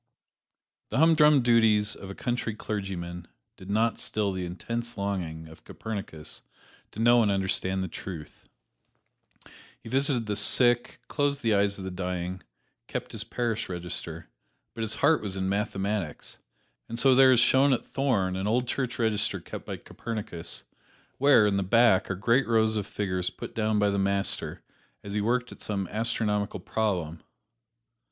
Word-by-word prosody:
The -, -, -2 dB
humdrum 150 Hz, -3 st, +5 dB
duties 110 Hz, -3 st, +4 dB
of 95 Hz, -, -10 dB
a 100 Hz, -, -7 dB
country 120 Hz, -3 st, -2 dB
clergyman 90 Hz, -5 st, -5 dB, 0.3 s
did 95 Hz, -, -12 dB
not 110 Hz, +3 st, +1 dB
still 105 Hz, -2 st, -1 dB
the 95 Hz, -1 st, -3 dB
intense 115 Hz, +6 st, -4 dB
longing 90 Hz, -5 st, -3 dB
of 80 Hz, -, -15 dB
Copernicus 100 Hz, -8 st, -6 dB, 0.5 s
to -, -, -8 dB
know 120 Hz, +1 st, +5 dB
and 105 Hz, -, +2 dB
understand 95 Hz, -1 st, 0 dB
the -, -, -3 dB
truth. 85 Hz, -2 st, -9 dB, 1.3 s
He -, -, -11 dB
visited 135 Hz, -2 st, +1 dB
the 105 Hz, -1 st, -2 dB
sick, 120 Hz, +3 st, +3 dB
closed 145 Hz, -2 st, 0 dB
the 115 Hz, -2 st, +3 dB
eyes 100 Hz, 0 st, +2 dB
of 95 Hz, -, -7 dB
the 95 Hz, -, -4 dB
dying, 90 Hz, 0 st, -4 dB, 0.5 s
kept -, -, -5 dB
his 110 Hz, -2 st, -4 dB
parish 115 Hz, -2 st, -2 dB
register, 90 Hz, -1 st, -4 dB, 0.5 s
but 115 Hz, -, -6 dB
his 110 Hz, -1 st, 0 dB
heart 150 Hz, +3 st, +3 dB
was 100 Hz, -2 st, -4 dB
in 95 Hz, 0 st, -1 dB
mathematics, 100 Hz, -4 st, -2 dB, 0.5 s
and 115 Hz, -, -5 dB
so 135 Hz, +2 st, +5 dB
there 130 Hz, 0 st, +7 dB
is 125 Hz, -, +5 dB
shown 135 Hz, +3 st, +4 dB
at 125 Hz, -, 0 dB
Thorn 105 Hz, -10 st, 0 dB
an 95 Hz, +2 st, -2 dB
old 120 Hz, +3 st, +1 dB
church 125 Hz, 0 st, -2 dB
register 110 Hz, -3 st, +1 dB
kept -, -, -9 dB
by -, -, -4 dB
Copernicus, 95 Hz, -7 st, -6 dB, 0.6 s
where, 135 Hz, -5 st, +6 dB
in 100 Hz, -1 st, +2 dB
the -, -, +1 dB
back, 110 Hz, 0 st, +4 dB
are 95 Hz, -, -1 dB
great 115 Hz, +8 st, +2 dB
rows 110 Hz, -1 st, +3 dB
of 105 Hz, -2 st, -2 dB
figures 90 Hz, -3 st, -2 dB
put -, -, -9 dB
down 110 Hz, -1 st, 0 dB
by 105 Hz, -1 st, +3 dB
the 100 Hz, -, 0 dB
Master 100 Hz, 0 st, -1 dB, 0.4 s
as 100 Hz, -, -7 dB
he 105 Hz, -, 0 dB
worked 125 Hz, +3 st, 0 dB
at -, -, -12 dB
some 100 Hz, -3 st, -2 dB
astronomical 105 Hz, -2 st, -1 dB
problem. 90 Hz, -6 st, -2 dB
105 Hz, 160 wpm, -27 LUFS, 95-115 Hz, 1.3 s, there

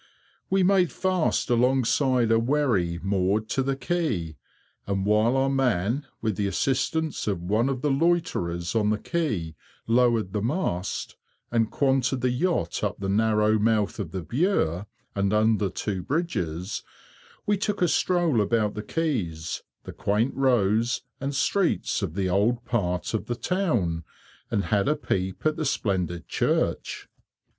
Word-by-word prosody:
We 190 Hz, 0 st, +3 dB
made 185 Hz, -2 st, +3 dB
fast 185 Hz, -3 st, 0 dB
alongside 125 Hz, 0 st, +2 dB
a 115 Hz, -, +5 dB
wherry 115 Hz, -10 st, +1 dB
moored 100 Hz, +2 st, +1 dB
to 135 Hz, -, 0 dB
the 135 Hz, +1 st, 0 dB
quay, 135 Hz, -, -2 dB, 0.5 s
and 100 Hz, -1 st, -1 dB
while 110 Hz, +5 st, +3 dB
our 135 Hz, 0 st, +2 dB
man, 130 Hz, -1 st, 0 dB, 0.2 s
with 110 Hz, -4 st, 0 dB
the 100 Hz, -, 0 dB
assistance 145 Hz, -, -1 dB
of 95 Hz, -5 st, -1 dB
one 110 Hz, +8 st, +1 dB
of 130 Hz, -2 st, -3 dB
the 150 Hz, -, +2 dB
loiterers 135 Hz, -, 0 dB
on 105 Hz, -2 st, +2 dB
the 105 Hz, -, +1 dB
quay, 105 Hz, -, -2 dB, 0.3 s
lowered 115 Hz, -4 st, +2 dB
the 105 Hz, -, -1 dB
mast, 110 Hz, -, -2 dB, 0.3 s
and 115 Hz, -2 st, +2 dB
quanted 135 Hz, -2 st, +1 dB
the 125 Hz, -, +2 dB
yacht 170 Hz, +8 st, -1 dB
up -, -, -1 dB
the 95 Hz, -1 st, -3 dB
narrow 110 Hz, +1 st, +3 dB
mouth 105 Hz, -1 st, +1 dB
of 100 Hz, -6 st, -3 dB
the 95 Hz, 0 st, -5 dB
Bure 105 Hz, -, 0 dB, 0.3 s
and 100 Hz, 0 st, 0 dB
under 105 Hz, -2 st, +3 dB
two 95 Hz, 0 st, -3 dB
bridges, 95 Hz, -, -2 dB, 0.6 s
we 205 Hz, -, +2 dB
took 205 Hz, +1 st, -2 dB
a 180 Hz, -, +3 dB
stroll 170 Hz, -8 st, +2 dB
about 105 Hz, 0 st, +1 dB
the 105 Hz, -, -4 dB
quays, 105 Hz, -, -2 dB, 0.2 s
the -, -, -8 dB
quaint 105 Hz, +6 st, 0 dB
"rows" 120 Hz, -2 st, +2 dB, 0.2 s
and 140 Hz, +1 st, -3 dB
streets 180 Hz, -, +1 dB
of 90 Hz, -5 st, -3 dB
the 95 Hz, -1 st, 0 dB
old 110 Hz, +6 st, +1 dB
part 90 Hz, -7 st, -1 dB
of 110 Hz, -1 st, -2 dB
the 120 Hz, -, -1 dB
town, 120 Hz, -, 0 dB, 0.5 s
and 100 Hz, -, 0 dB
had 100 Hz, -1 st, +2 dB
a 150 Hz, -, +3 dB
peep 95 Hz, -9 st, -3 dB
at 155 Hz, 0 st, +2 dB
the -, -, -1 dB
splendid 90 Hz, -9 st, -1 dB
church. -, -, -1 dB
115 Hz, 150 wpm, -26 LUFS, 100-135 Hz, 0.6 s, a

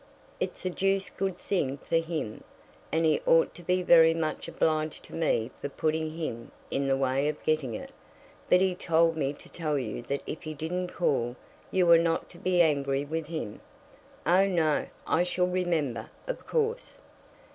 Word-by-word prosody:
"It's -, -, -4 dB
a 185 Hz, -, 0 dB
deuced 195 Hz, +1 st, 0 dB
good 190 Hz, -2 st, -1 dB
thing 140 Hz, -10 st, -1 dB
for 165 Hz, -, 0 dB
him, 160 Hz, -9 st, -3 dB, 0.5 s
and 165 Hz, +1 st, +2 dB
he 155 Hz, -1 st, +3 dB
ought 165 Hz, 0 st, +5 dB
to -, -, -11 dB
be 180 Hz, +1 st, +1 dB
very 165 Hz, -2 st, +7 dB
much 160 Hz, -2 st, -2 dB
obliged 155 Hz, -1 st, 0 dB
to -, -, -13 dB
me 130 Hz, -7 st, 0 dB
for 140 Hz, -, -3 dB
putting 155 Hz, +2 st, -1 dB
him 115 Hz, -8 st, -5 dB, 0.2 s
in 140 Hz, 0 st, 0 dB
the 135 Hz, 0 st, +2 dB
way 135 Hz, +1 st, +1 dB
of 150 Hz, 0 st, -3 dB
getting 150 Hz, -7 st, 0 dB
it. -, -, -7 dB, 0.6 s
But 180 Hz, -, +6 dB
he 190 Hz, -1 st, +3 dB
told 165 Hz, -2 st, +2 dB
me 140 Hz, -3 st, 0 dB
to -, -, -15 dB
tell 155 Hz, -3 st, -2 dB
you 120 Hz, -4 st, -3 dB
that 140 Hz, +4 st, -3 dB
if 155 Hz, -, -5 dB
he 155 Hz, -2 st, -6 dB
didn't 180 Hz, +5 st, -2 dB
call, 125 Hz, -9 st, 0 dB, 0.3 s
you 185 Hz, -1 st, +2 dB
were 170 Hz, -1 st, +7 dB
not 165 Hz, 0 st, 0 dB
to 170 Hz, -, -14 dB
be 180 Hz, -1 st, +3 dB
angry 140 Hz, -3 st, +1 dB
with 160 Hz, +1 st, -3 dB
him." 155 Hz, -10 st, -5 dB, 0.6 s
"Oh, 185 Hz, +3 st, +5 dB
no; 165 Hz, -5 st, +1 dB, 0.2 s
I -, -, +2 dB
shall 180 Hz, 0 st, +1 dB
remember, 165 Hz, -11 st, -1 dB, 0.2 s
of -, -, -5 dB
course." 465 Hz, +1 st, -1 dB
160 Hz, 180 wpm, -28 LUFS, 140-175 Hz, 0.6 s, very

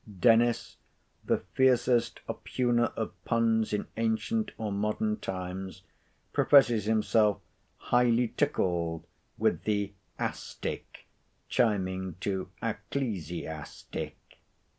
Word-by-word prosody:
Dennis, 120 Hz, +1 st, +3 dB, 0.5 s
the -, -, 0 dB
fiercest 125 Hz, -2 st, +3 dB
oppugner 120 Hz, -2 st, 0 dB
of -, -, -2 dB
puns 115 Hz, -1 st, +2 dB
in 105 Hz, -, -1 dB
ancient 115 Hz, -, 0 dB
or 110 Hz, -2 st, -3 dB
modern 105 Hz, +1 st, 0 dB
times, 95 Hz, -1 st, -5 dB, 0.5 s
professes 120 Hz, -7 st, +5 dB
himself 110 Hz, -1 st, +3 dB, 0.4 s
highly 120 Hz, -1 st, +3 dB
tickled 85 Hz, -, 0 dB, 0.3 s
with -, -, +1 dB
the 100 Hz, -1 st, 0 dB, 0.2 s
"a -, -, -1 dB
stick" -, -, -7 dB, 0.4 s
chiming 95 Hz, -5 st, +1 dB
to 95 Hz, -2 st, -2 dB
"ecclesiastic." 90 Hz, -, -4 dB
110 Hz, 90 wpm, -29 LUFS, 95-120 Hz, 0.5 s, professes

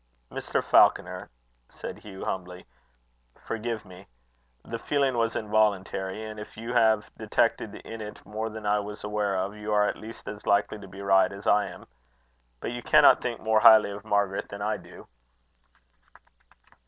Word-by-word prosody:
"Mr. -, -, -2 dB
Falconer," -, -, +3 dB, 0.4 s
said -, -, -8 dB
Hugh 95 Hz, -2 st, -9 dB
humbly, 90 Hz, -1 st, -5 dB, 0.7 s
"forgive 115 Hz, -1 st, -4 dB
me. 95 Hz, -1 st, -14 dB, 0.6 s
The 115 Hz, -, -5 dB
feeling 140 Hz, -2 st, +1 dB
was 115 Hz, -1 st, 0 dB
involuntary; 105 Hz, -1 st, 0 dB
and 110 Hz, 0 st, -7 dB
if 105 Hz, -, -10 dB
you 115 Hz, +2 st, -5 dB
have 110 Hz, -3 st, +3 dB
detected -, -, 0 dB
in 115 Hz, 0 st, -8 dB
it 105 Hz, 0 st, -9 dB
more 110 Hz, +2 st, -4 dB
than 110 Hz, -1 st, -8 dB
I 105 Hz, 0 st, +2 dB
was 105 Hz, 0 st, -7 dB
aware 105 Hz, -1 st, -1 dB
of, 95 Hz, +2 st, -2 dB
you 105 Hz, 0 st, -5 dB
are 105 Hz, 0 st, +4 dB
at -, -, -2 dB
least 110 Hz, +1 st, -10 dB
as 105 Hz, 0 st, -8 dB
likely 100 Hz, +1 st, +2 dB
to 100 Hz, -, -11 dB
be 95 Hz, +1 st, -10 dB
right 95 Hz, -1 st, +4 dB
as 100 Hz, +1 st, -10 dB
I 105 Hz, -1 st, +3 dB
am. -, -, -11 dB, 0.8 s
But -, -, -3 dB
you 120 Hz, 0 st, -5 dB
cannot -, -, +6 dB
think 120 Hz, -2 st, -3 dB
more 110 Hz, 0 st, +3 dB
highly 110 Hz, -2 st, +7 dB
of 100 Hz, 0 st, -8 dB
Margaret 100 Hz, -2 st, 0 dB
than 100 Hz, 0 st, -6 dB
I 105 Hz, +1 st, 0 dB
do." -, -, -14 dB
105 Hz, 165 wpm, -27 LUFS, 100-110 Hz, 0.8 s, highly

